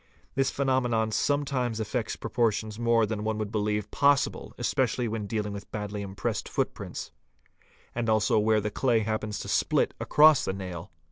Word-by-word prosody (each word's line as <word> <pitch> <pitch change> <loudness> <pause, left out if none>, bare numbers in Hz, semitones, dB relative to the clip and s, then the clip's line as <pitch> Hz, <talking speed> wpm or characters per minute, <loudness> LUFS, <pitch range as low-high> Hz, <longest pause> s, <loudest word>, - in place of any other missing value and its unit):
This 135 0 +1
phenomenon 125 -5 +1
sometimes 130 -2 0
affects 110 +1 -2
proportions 110 -2 -1
more 115 -1 +3
than 105 0 -3
one 110 0 -1
would 105 -1 -3
believe 105 -1 -1
possible 140 -2 +2
especially 125 -1 0
when 110 -2 -3
dealing 105 -1 -2
with 100 -1 -9
badly 105 -1 -4
impressed 95 -1 -3
footprints, - - -3 0.8
and 115 -1 -1
also 110 0 +3
where 110 0 +3
the 105 +1 -3
clay 120 -2 +2
happens 110 -1 -2
to - - -7
split - - +1
across 155 -1 +6
the 95 - -1
nail. 90 -1 -7
110 Hz, 155 wpm, -28 LUFS, 105-120 Hz, 0.8 s, across